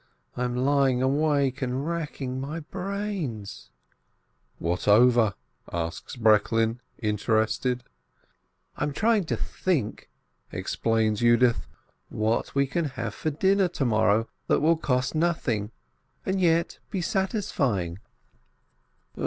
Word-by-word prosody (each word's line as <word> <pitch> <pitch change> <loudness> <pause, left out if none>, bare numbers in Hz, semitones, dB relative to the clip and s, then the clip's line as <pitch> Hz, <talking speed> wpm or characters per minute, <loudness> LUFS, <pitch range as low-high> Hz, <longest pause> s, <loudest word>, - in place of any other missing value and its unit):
I'm 125 0 -1
lying 130 -1 +2
awake 140 -1 +1
and 130 +3 -2
racking 145 -6 -3
my 150 +5 -4
brains." 180 - -5 0.9
"What 85 +4 -2
over?" 115 0 +5 0.4
asks 85 -1 -4
Breklin, 115 0 +3 0.2
interested. 110 +3 0 0.9
"I'm 145 - -1
trying 215 +3 +2
to - - -1
think," 150 - -2 0.4
explains 110 -2 0
Yudith, 120 0 +3 0.4
"what 110 +4 -1
we 140 0 +3
can 170 +5 -1
have 130 -6 -4
for 155 - -2
dinner 190 +5 +2
to 160 -6 -2
morrow 110 -1 +3 0.2
that - - +3
will 165 +3 +4
cost 130 -4 0
nothing, 155 -11 0 0.6
and 190 0 0
yet 170 -1 +2
be 190 - -2
satisfying." 145 - -1
130 Hz, 105 wpm, -26 LUFS, 110-160 Hz, 0.9 s, over